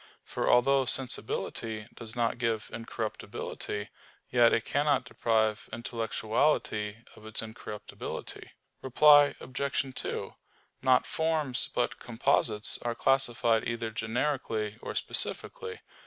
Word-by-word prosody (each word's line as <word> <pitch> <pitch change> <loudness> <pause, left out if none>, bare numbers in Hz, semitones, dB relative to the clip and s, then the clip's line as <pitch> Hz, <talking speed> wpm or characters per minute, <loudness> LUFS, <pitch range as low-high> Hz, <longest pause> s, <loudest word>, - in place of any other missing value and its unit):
For - - -2
although 135 +2 +4
sensibility 115 -4 -1
does 115 0 -6
not 120 0 0
give 115 -3 -1
incorruptibility, 110 -2 -5 0.4
yet 120 -1 +6
it 115 - +1
cannot 145 -3 +1
deprive 110 -3 0
intellectuality 115 -1 -1
of - - -15
its 110 0 0
incorruptibility. 110 -1 -7 0.3
Reply 145 +2 +6
Obj. 135 0 -2
2: - - -4 0.5
Not 130 -1 +4
forms, 160 -5 0
but 120 - 0
composites, 115 -3 +1
are 120 -1 -2
classified 120 -4 +2
either 115 -1 -2
generically 110 -1 -2
or - - -6
specifically. 460 -3 -1
120 Hz, 105 wpm, -29 LUFS, 110-135 Hz, 0.5 s, yet